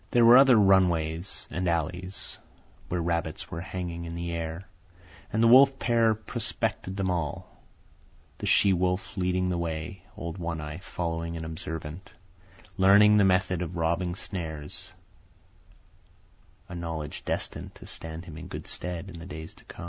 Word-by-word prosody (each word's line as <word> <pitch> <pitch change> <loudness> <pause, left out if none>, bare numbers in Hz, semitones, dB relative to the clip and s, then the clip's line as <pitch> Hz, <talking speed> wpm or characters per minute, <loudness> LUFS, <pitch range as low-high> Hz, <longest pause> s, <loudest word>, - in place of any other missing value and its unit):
There 120 -1 +5
were 120 +2 +10
other 130 -3 +7
run 95 -3 +6
ways 80 +2 -3
and 90 +1 -1
alleys 90 +3 -3 0.5
where 90 -1 -1
rabbits 85 -2 -2
were 85 - -4
hanging 85 -2 -5
in 85 0 -6
the 85 0 -3
air, 85 +2 -4 0.6
and 110 +2 +2
the - - +6
wolf 135 +3 +7
pair 115 -3 +3
prospected 110 -3 -3
them 95 -2 0
all, 85 -5 -4 0.8
the - - -3
she 100 - +5
wolf 90 +1 -1
leading 90 -1 0
the 90 -1 -1
way, 85 +2 -4
old 85 +2 -5
One 85 -2 -3
Eye 75 +2 -6
following 85 -3 -3
and 80 -1 -5
observant, 80 +2 -6 0.6
learning 100 +2 +7
the 100 - +6
method 95 -1 +2
of 85 0 -4
robbing 85 +2 0
snares—a 80 -6 -5 1.8
knowledge 80 -3 -5
destined - - -3
to - - -12
stand 80 +1 -7
him 80 -3 -9
in 90 - -8
good - - -7
stead 90 +1 -3
in 85 -3 -9
the 85 - -9
days 80 -3 -7
to - - -19
85 Hz, 155 wpm, -28 LUFS, 80-95 Hz, 1.8 s, were